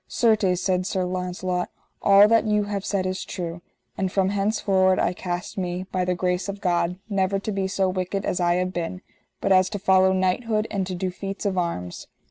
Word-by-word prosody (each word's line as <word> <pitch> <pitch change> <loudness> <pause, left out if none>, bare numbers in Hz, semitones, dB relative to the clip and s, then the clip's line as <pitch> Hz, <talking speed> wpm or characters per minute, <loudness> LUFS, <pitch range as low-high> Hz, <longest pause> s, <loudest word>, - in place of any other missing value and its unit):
Certes, 215 -6 +2
said 185 -1 +1
Sir 190 -3 -1
Launcelot, 180 0 -2 0.3
all 200 +1 +7
that 225 0 +3
you 210 -1 +2
have 205 -1 -3
said 195 -2 -1
is 185 0 -2
true, 175 -2 -5 0.3
and 190 -1 -1
from 190 -1 +2
henceforward 195 -2 +2
I 175 - +1
cast 180 +3 -4
me, 180 0 -2
by 185 -1 0
the 180 0 0
grace 180 +2 -1
of 200 0 -5
God, 180 -2 0
never 195 -2 +1
to 200 +2 -4
be 195 -1 -1
so 190 0 0
wicked 185 +1 -2
as 180 - -1
I 175 -1 +2
have 185 +1 -1
been, 175 +2 -4 0.4
but - - 0
as 185 -1 +5
to 205 - -4
follow 190 -1 +4
knighthood 215 +4 +1
and 195 -3 -1
to 185 - -3
do 185 +1 -2
feats 195 +3 -6
of 195 -2 0
arms. 170 - -3
185 Hz, 205 wpm, -24 LUFS, 180-200 Hz, 0.4 s, all